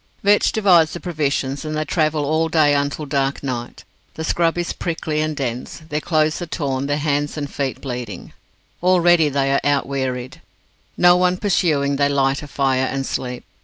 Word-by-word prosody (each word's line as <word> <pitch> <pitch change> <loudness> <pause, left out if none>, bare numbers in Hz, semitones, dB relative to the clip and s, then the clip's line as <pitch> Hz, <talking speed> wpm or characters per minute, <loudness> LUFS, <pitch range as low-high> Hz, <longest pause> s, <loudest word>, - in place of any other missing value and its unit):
Vetch 205 +1 +4
divides 180 -7 +4
the 175 - -5
provisions, 145 -5 -2
and 155 0 -3
they 155 - -1
travel 155 -1 0
all 155 +3 +1
that 160 - -6
day 150 -3 +4
until 145 +1 -1
dark 140 -1 -1
night. 125 -3 -5 0.3
The 160 - -5
scrub 165 +1 +1
is 175 0 -2
prickly 160 -2 -2
and 155 0 -2
dense. 125 +4 -4
Their 150 +1 -2
clothes 155 0 +1
are 175 - -4
torn, 140 -4 -2
their 145 0 0
hands 145 0 -1
and 145 -1 -3
feet 140 -1 -4
bleeding. 120 -8 -6 0.5
Already 175 -3 +4
they 135 -1 0
feel 140 - +3
out 140 - +1
wearied. 130 -2 -4 0.6
No 175 0 +6
one 180 0 +2
pursuing, 150 -8 +1
they 140 0 +2
light 135 -1 +1
a 150 - -8
fire, 130 -2 +1
and 135 0 -3
sleep. 125 -2 -4
145 Hz, 185 wpm, -20 LUFS, 135-160 Hz, 0.6 s, No